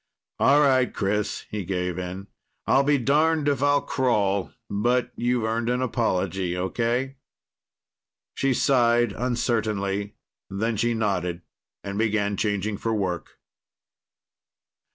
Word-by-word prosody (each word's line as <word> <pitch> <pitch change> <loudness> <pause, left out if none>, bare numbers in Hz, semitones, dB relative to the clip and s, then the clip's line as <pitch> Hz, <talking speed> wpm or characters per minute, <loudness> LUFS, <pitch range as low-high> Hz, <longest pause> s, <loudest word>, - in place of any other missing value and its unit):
"All 145 +2 +5
right, 130 -3 +3
Chris," 105 +1 -2
he 105 -2 -3
gave 90 -1 -2
in. 90 +2 -6 0.4
"I'll 135 - +4
be 145 +1 +3
darned 150 +4 +2
if 140 -3 +1
I'll 145 0 +3
crawl, 100 -7 0 0.2
but 120 +5 0
you've 120 -1 0
earned 115 +1 -1
an 125 +1 0
apology. 95 -6 -1
Okay?" 120 +8 -1 1.2
She 135 - 0
sighed 120 -3 +3
uncertainly. 105 -4 -1 0.3
Then 110 +4 -1
she 120 +3 0
nodded 90 -5 -1 0.4
and 100 +1 -4
began 105 -2 +1
changing 105 0 -1
for 115 -1 -1
work. 90 -5 -3
110 Hz, 115 wpm, -25 LUFS, 100-125 Hz, 1.2 s, All